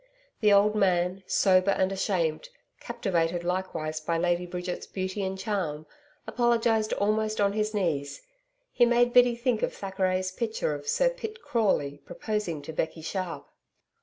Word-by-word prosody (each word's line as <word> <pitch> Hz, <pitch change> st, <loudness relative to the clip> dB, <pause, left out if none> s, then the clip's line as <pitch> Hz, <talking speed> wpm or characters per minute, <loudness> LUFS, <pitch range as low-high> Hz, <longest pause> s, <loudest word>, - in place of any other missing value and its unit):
The 210 Hz, -2 st, +4 dB
old 205 Hz, +1 st, +5 dB
man, 185 Hz, -2 st, +1 dB
sober 185 Hz, -1 st, +3 dB
and 190 Hz, -1 st, +2 dB
ashamed, 185 Hz, -, -1 dB, 0.3 s
captivated 175 Hz, -3 st, -1 dB
likewise 175 Hz, -4 st, -2 dB
by 165 Hz, +2 st, -1 dB
Lady 175 Hz, +1 st, 0 dB
Bridget's 180 Hz, 0 st, -5 dB
beauty 190 Hz, +1 st, -3 dB
and 190 Hz, 0 st, -3 dB
charm, 185 Hz, -7 st, -3 dB, 0.4 s
apologised 230 Hz, -2 st, +1 dB
almost 215 Hz, +1 st, 0 dB
on 200 Hz, -1 st, +2 dB
his 215 Hz, 0 st, -1 dB
knees 160 Hz, -, -2 dB, 0.5 s
he 245 Hz, -, +3 dB
made 240 Hz, 0 st, +3 dB
Biddy 245 Hz, -1 st, +6 dB
think 235 Hz, -2 st, 0 dB
of -, -, -1 dB
Thackeray's 185 Hz, -1 st, -1 dB
picture 220 Hz, -6 st, -2 dB
of 145 Hz, 0 st, -7 dB
Sir -, -, +2 dB
Pitt 455 Hz, -2 st, -8 dB
Crawley 145 Hz, -11 st, 0 dB
proposing 210 Hz, -9 st, -3 dB
to 160 Hz, -, -7 dB
Becky 160 Hz, +1 st, -3 dB
Sharp. 165 Hz, -5 st, -4 dB
190 Hz, 145 wpm, -27 LUFS, 175-215 Hz, 0.5 s, Biddy